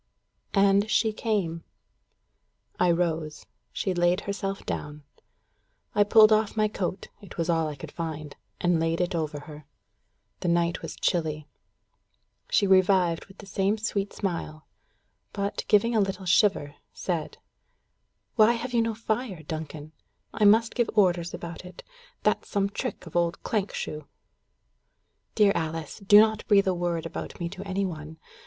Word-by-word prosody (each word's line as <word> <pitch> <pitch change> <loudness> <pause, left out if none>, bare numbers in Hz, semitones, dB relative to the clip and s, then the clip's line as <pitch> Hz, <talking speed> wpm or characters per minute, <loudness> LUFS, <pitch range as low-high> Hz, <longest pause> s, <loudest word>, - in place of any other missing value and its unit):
And 200 +1 +4
she 220 0 +2
came. 190 -8 -2 1.2
I 180 - +4
rose. 165 -3 -1 0.3
She 190 - -2
laid 175 +2 +2
herself 195 0 -4
down. 150 0 -5 0.9
I 205 - +5
pulled 215 +1 +6
off 215 0 +2
my 215 0 +3
coat 190 -2 -4
it 200 - -12
was 170 0 0
all 165 -1 +1
I 150 - -5
could 135 - -9
find 155 -3 -5 0.2
and 175 -2 +2
laid 165 0 0
it 180 +1 0
over 155 -3 -3
her. 150 -1 -12 0.7
The - - -3
night 170 0 +1
was 165 - -6
chilly. 155 -4 -1 1.0
She 205 - +3
revived 185 -3 +3
with 195 - -17
the 205 - -11
same 195 +2 0
sweet 205 -2 -2
smile, 165 -5 -4 0.7
but, 200 0 -3
giving 230 +3 +3
a - - +4
little 195 -1 -2
shiver, 175 -5 +3 0.2
said: 170 -4 -3 1.0
"Why 220 +1 +6
have 245 +2 -5
you 235 - +3
no 225 -1 -1
fire, 220 -5 -3
Duncan? 155 -1 -6 0.4
I 210 0 +2
must 225 +3 +5
give 240 -3 0
orders 175 -4 +3
about 170 +1 -7
it. 180 0 -11 0.4
That's - - +1
some 200 -1 0
trick - - -5
of 165 - -12
old 170 -1 0
Clankshoe." 190 -7 -3 1.3
"Dear 210 -2 +5
Alice, 160 +1 -4
do 205 +1 +7
not 220 0 +3
breath 200 -2 +5
a 190 - +2
word 175 -2 -2
about 165 - -6
me 170 - -2
to 190 +2 -8
any 195 +1 -1
one. 160 -3 -7
185 Hz, 150 wpm, -27 LUFS, 165-205 Hz, 1.3 s, do